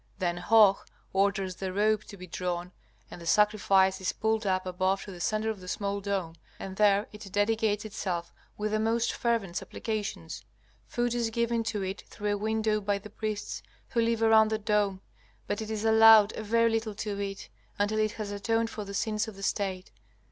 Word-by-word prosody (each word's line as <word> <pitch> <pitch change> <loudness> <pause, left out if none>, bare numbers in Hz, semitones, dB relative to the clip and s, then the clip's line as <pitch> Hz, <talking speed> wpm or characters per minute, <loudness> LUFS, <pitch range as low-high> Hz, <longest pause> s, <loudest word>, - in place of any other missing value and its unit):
Then 175 -2 -1
Hoh 205 +1 +5 0.3
orders 195 -1 +1
the 190 -1 -3
ropes 210 +2 +1
to 200 - -10
be 185 - -9
drawn 180 0 -3 0.4
and 175 - -9
the 170 - -8
sacrifice 195 -1 +3
is 185 - -1
pulled 220 -1 0
up 185 0 +1
above 185 +1 0
to 200 - -9
the 180 - -10
centre 215 +3 0
of 215 - -7
the 180 - -11
small 200 +1 -2
dome, 195 -5 -2 0.2
and 190 -1 -7
there 205 0 +4
it 210 -2 -10
dedicates 210 +1 +1
itself 175 -5 -4 0.2
with 210 0 -2
the 215 - +1
most 225 +1 +1
fervent 230 -7 -1
supplications. 210 - -4 0.4
Food 240 0 -1
is 235 -2 0
given 235 0 0
to 210 -3 -2
it 190 +1 -4
through 205 0 -2
a - - -1
window 215 0 0
by 200 0 0
the 205 +1 -11
priests, 215 -1 -4 0.3
who 235 - +1
live 230 0 +1
around 220 -1 +6
the 220 - 0
dome, 210 -3 0 0.4
but 205 - -2
it 220 - -5
is 220 0 -3
allowed 220 -1 +7
a - - -4
very 230 +2 +2
little 225 -2 -1
to 205 -1 -4
eat, 195 -1 -5 0.3
until 205 +2 +1
it 215 0 +1
has 215 -2 -5
atoned 225 +3 0
for 215 - -5
the 200 0 -7
sins 215 +1 -1
of 220 - -8
the 195 - -10
State. 190 - -2
210 Hz, 200 wpm, -29 LUFS, 195-220 Hz, 0.4 s, allowed